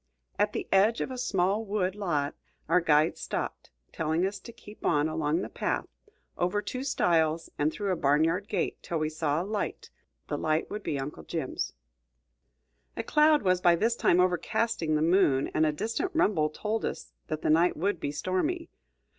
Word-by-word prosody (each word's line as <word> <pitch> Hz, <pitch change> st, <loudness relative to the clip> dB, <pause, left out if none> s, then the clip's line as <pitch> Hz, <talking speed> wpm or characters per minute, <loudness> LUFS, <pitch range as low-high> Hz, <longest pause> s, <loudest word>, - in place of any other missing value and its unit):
At 205 Hz, 0 st, +2 dB
the -, -, -3 dB
edge 205 Hz, +4 st, +4 dB
of -, -, -2 dB
a 255 Hz, -, -5 dB
small 200 Hz, -2 st, +1 dB
wood 200 Hz, -3 st, -1 dB
lot 170 Hz, -8 st, -1 dB, 0.3 s
our 180 Hz, -, +4 dB
guides 155 Hz, -1 st, +3 dB
stopped, -, -, -4 dB, 0.2 s
telling 160 Hz, +3 st, 0 dB
us 195 Hz, +1 st, -3 dB
to 235 Hz, -, -11 dB
keep 210 Hz, -2 st, -14 dB
on 150 Hz, -2 st, +2 dB
along 155 Hz, +1 st, 0 dB
the -, -, -4 dB
path, -, -, -2 dB, 0.5 s
over 180 Hz, +4 st, +1 dB
two 255 Hz, +5 st, -4 dB
stiles 165 Hz, -, +1 dB
and 150 Hz, +1 st, +2 dB
through 200 Hz, +1 st, -2 dB
a -, -, +2 dB
barn 145 Hz, -1 st, +3 dB
yard 180 Hz, +5 st, 0 dB
gate, 195 Hz, -5 st, -2 dB
till 170 Hz, -, -3 dB
we 155 Hz, -1 st, 0 dB
saw 155 Hz, 0 st, -1 dB
a -, -, -6 dB
light; 210 Hz, 0 st, -4 dB, 0.4 s
the -, -, -3 dB
light 155 Hz, +1 st, 0 dB
would 210 Hz, -, -4 dB
be 145 Hz, -, -2 dB
Uncle 135 Hz, -, -5 dB
Jim's. 75 Hz, -, -3 dB, 1.2 s
A -, -, -2 dB
cloud 300 Hz, -2 st, +4 dB
was 185 Hz, -1 st, +2 dB
by 175 Hz, -1 st, +5 dB
this 225 Hz, +7 st, +1 dB
time 180 Hz, -, +3 dB
overcasting 180 Hz, -1 st, +1 dB
the 150 Hz, -, +2 dB
moon, 160 Hz, -6 st, +3 dB
and 155 Hz, 0 st, +3 dB
a -, -, +2 dB
distant 230 Hz, -, -2 dB
rumble 180 Hz, -, +2 dB
told 215 Hz, +8 st, -3 dB
us -, -, -4 dB, 0.2 s
that 155 Hz, 0 st, -4 dB
the -, -, +3 dB
night 170 Hz, +3 st, +3 dB
would 195 Hz, +1 st, 0 dB
be 145 Hz, -, -2 dB
stormy. 300 Hz, -, -2 dB
180 Hz, 190 wpm, -28 LUFS, 155-210 Hz, 1.2 s, by